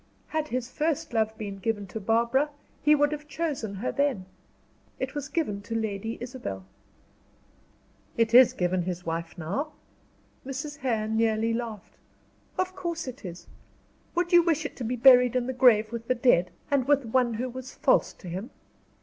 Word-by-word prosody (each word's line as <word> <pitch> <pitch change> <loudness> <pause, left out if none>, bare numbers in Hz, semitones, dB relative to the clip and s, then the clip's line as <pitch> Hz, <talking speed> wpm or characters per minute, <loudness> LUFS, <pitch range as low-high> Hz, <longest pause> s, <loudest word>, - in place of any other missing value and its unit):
Had 315 -1 -1
his 250 -3 -2
first 300 -2 -2
love 220 -1 0
been 200 -2 -6
given 205 0 -1
to 195 +4 -6
Barbara, 235 +7 +2 0.3
he 300 0 +5
would 290 0 +2
have 300 0 -5
chosen 290 -10 -3
her 205 +6 -2
then. 280 -10 0 0.7
It 260 0 -3
was 285 -2 -4
given 270 -10 -1
to 225 +3 -5
Lady 220 0 -2
Isabel." 240 - -6 1.5
"It 230 0 +2
is 250 0 +8
given 180 0 0
his 180 0 -4
wife 165 +1 -4
now?" 235 - -3 0.7
Mrs. 285 +3 -5
Hare 235 -6 -1
nearly 220 0 +1
laughed. 230 -3 -5 0.6
"Of 370 0 -1
course 335 -4 -4
it 255 0 -8
is; 175 -2 -8 0.7
would 350 +1 0
you 345 - +9
wish 320 -3 +1
it - - -5
to 255 - -5
be 240 +2 -1
buried 250 0 +7
in 250 -1 +1
the 260 - -2
grave 235 -4 +5
with 230 -1 -6
the 255 - +2
dead, 235 -8 +3 0.2
and 275 -3 +2
with 285 -2 +3
one 240 0 +1
who 245 +4 -2
was 255 +1 -8
false - - +3
to 185 - -13
him? 190 +8 -5
240 Hz, 175 wpm, -27 LUFS, 215-280 Hz, 1.5 s, you